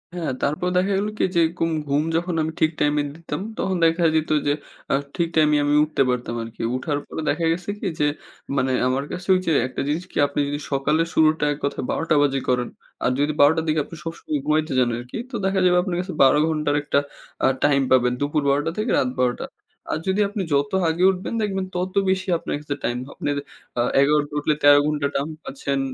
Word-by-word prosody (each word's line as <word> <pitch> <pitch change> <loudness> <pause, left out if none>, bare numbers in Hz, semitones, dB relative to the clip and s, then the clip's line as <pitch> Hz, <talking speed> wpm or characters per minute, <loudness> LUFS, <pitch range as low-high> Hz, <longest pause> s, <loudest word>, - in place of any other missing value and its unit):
হ্যাঁ, 165 -6 -2
তারপর 150 +5 0
দেখা 190 +2 +2
গেলো 205 +2 -1
কি - - -2
এইযে 175 -2 +1 0.2
গুম 165 0 +1 0.2
ঘুম 140 +2 +1
যখন 175 +2 0
আমি 155 +1 -1
ঠিক 160 0 +3
টাইমে 150 0 +2
দিতাম, 165 +2 -5 0.2
তখন 190 - -1
দেখা 165 +1 +2
যেত 155 0 0 0.2
যে, 145 - +3 0.4
আ - - +3 0.2
ঠিক 170 -2 +1
টাইমে 150 -1 +4
আমি 145 - +2
উঠতে 150 -2 -1
পারতাম 125 -1 -2
আরকি। 115 0 -9
উঠার 145 +3 -2
পরে 160 - -6
দেখা 170 - 0
গেছে 175 +3 -3
কি - - -3
যে 150 - +3 0.5
মানে 130 -1 +1 0.2
আমার 130 +2 0
কাছে 180 +1 -6
ওইযে 185 -2 0 0.2
একটা 130 - -5
জিনিস 155 +4 -1
কি? - - -7
আপনি 140 - -4
যদি 145 +1 -3
সকালের 150 +4 +1
শুরুটা 155 -1 +3
এক - - -8
কথায় 140 - -2
১২ - - -1
টা 155 - +4
বাজে 140 -1 +2
করেন 125 -1 +1 0.3
আর 125 - +2
যদি 145 +1 +1
১২ 145 +1 +7
টার 160 -1 -1
দিকে 155 0 +2
আপনি - - -10
সবসময় 165 -2 -4
ঘুমাইতে 155 +1 +1
যান 125 -1 +3
আরকি। 120 +1 -7
তো 240 - -5
দেখা 190 0 +1
যাবে 180 0 +4
আপনার 180 -2 -2
কাছে 185 0 -6
১২ 135 +2 +6
ঘন্টার 150 -2 0
একটা 145 - +2 0.5
আ - - +6 0.2
টাইম 145 -1 +4
পাবেন। 125 -1 +4
দুপুর 145 +1 0
১২ 140 +1 +3
টা - - 0
থেকে 215 +3 -1
রাত 125 - +2
১২ 125 -1 +2
টা। - - -3 0.5
আর - - -1
যদি 190 +2 +2
আপনি 205 -1 -3
যত 140 0 +1 0.2
আগে 165 +3 0
উঠবেন, 185 +4 -5
দেখবেন 195 -2 -1
তত 180 +1 -2 0.2
বেশি 190 +1 0
আপনার - - -4
কাছে 150 -1 -4
টাইম 120 - -1
হ - - -13
আপনের 145 -1 -2 0.4
আ - - +4 0.2
১১ 150 +2 +4
টা - - -15
উঠলে 150 +1 +1
১৩ 145 0 +7
ঘন্টা 150 -2 0
টাইম 140 +3 -1
পাচ্ছেন। 140 0 -3
150 Hz, 225 wpm, -23 LUFS, 140-170 Hz, 0.5 s, ১২